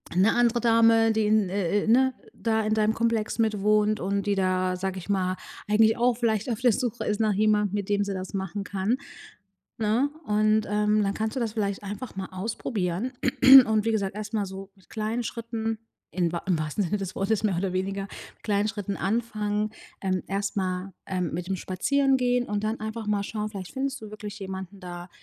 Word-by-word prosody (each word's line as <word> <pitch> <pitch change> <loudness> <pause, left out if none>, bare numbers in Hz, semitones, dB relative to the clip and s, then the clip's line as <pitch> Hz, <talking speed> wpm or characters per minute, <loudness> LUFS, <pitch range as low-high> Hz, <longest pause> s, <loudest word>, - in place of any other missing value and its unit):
'ne 195 +5 +4
andere 240 0 +3
Dame, 225 -1 +5
die 220 -1 +1
in, 215 -2 +3
äh 200 +1 0
äh - - -6
ne, 260 +3 +4 0.2
da 220 -1 0
in 215 - +1
deinem 215 0 +2
Komplex 230 -1 0
mit 215 -3 +1
wohnt 210 +1 +3
und 200 +2 -1
die 200 - +2
da, 185 -1 +1
sage 190 +1 -3
ich 175 - -11
mal, 185 -2 0 0.3
eigentlich 220 +1 +5
auch 240 0 +3
vielleicht 225 0 0
auf 225 - -2
der 245 -3 +5
Suche 245 0 -2
ist 210 -1 -1
nach 215 -1 +3
jemandem, 210 -1 +2
mit 200 -2 -2
dem 205 0 +2
sie 200 - -3
das 185 +1 -6
machen 195 +1 -3
kann, 200 +5 0 0.8
ne? 225 +6 +2 0.2
Und, 215 0 +2
ähm, 210 0 +2
dann 195 - 0
kannst 220 +2 -2
du - - +1
das 225 -2 -2
vielleicht 200 -3 -1
einfach 205 +3 -6
mal 190 - -3
ausprobieren 195 +1 -2 0.5
und 215 -1 +1
wie 225 - +2
gesagt, 200 -3 -1
erst 215 0 -6
mal 210 -2 0
so 195 +1 -8
mit 190 - -25
kleinen 220 +2 -2
Schritten, 225 -1 -3 0.4
in 175 -3 +1
wahr 170 - -4
im 175 -4 +2
wahrsten 155 +6 -1
Sinne 210 +4 -1
des 195 -2 -5
Wortes 200 +2 0
mehr 200 -5 +1
oder 185 0 -1
weniger, 195 +1 -2
mit 195 - -12
kleinen 205 0 +1
Schritten 205 -2 -4
anfangen. 215 -1 -1 0.3
Ähm, 185 -2 0
erst 200 +1 -2
mal, 185 0 -2
ähm, 180 -3 -2
mit 175 +2 -4
dem 195 - -1
Spazierengehen 250 +6 +1
und 205 0 -2
dann 220 +1 -2
einfach 220 0 -5
mal 205 -1 +1
schauen: 215 0 -3
Vielleicht 195 -4 -7
findest 270 0 -2
du 215 - -9
wirklich 210 -1 -7
jemanden 190 0 -7
da, 175 0 -8
210 Hz, 205 wpm, -26 LUFS, 195-220 Hz, 0.8 s, Dame